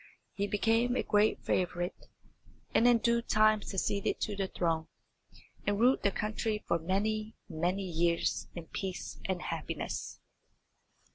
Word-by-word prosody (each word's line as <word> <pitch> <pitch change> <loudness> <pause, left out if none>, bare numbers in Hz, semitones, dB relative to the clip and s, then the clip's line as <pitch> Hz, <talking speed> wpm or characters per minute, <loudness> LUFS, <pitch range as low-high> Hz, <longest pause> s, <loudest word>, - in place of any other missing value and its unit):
He 200 0 -1
became 225 +4 +2
a - - +1
great 210 0 +2
favourite, 175 0 -1 0.7
and 240 - +5
in 240 -1 +6
due 235 +1 +2
time 215 -2 +4
succeeded 200 0 -1
to 210 - -1
the 195 -1 -1
throne, 165 -3 -1 0.8
and 205 0 +1
ruled 250 +3 +4
the 200 - +3
country 215 +1 -2
for 170 - +2
many, 215 +5 -1
many 180 +3 -1
years 170 -1 0
in 170 -2 -6
peace 185 +2 -5
and 185 -2 -2
happiness. - - -4
200 Hz, 135 wpm, -32 LUFS, 180-215 Hz, 0.8 s, in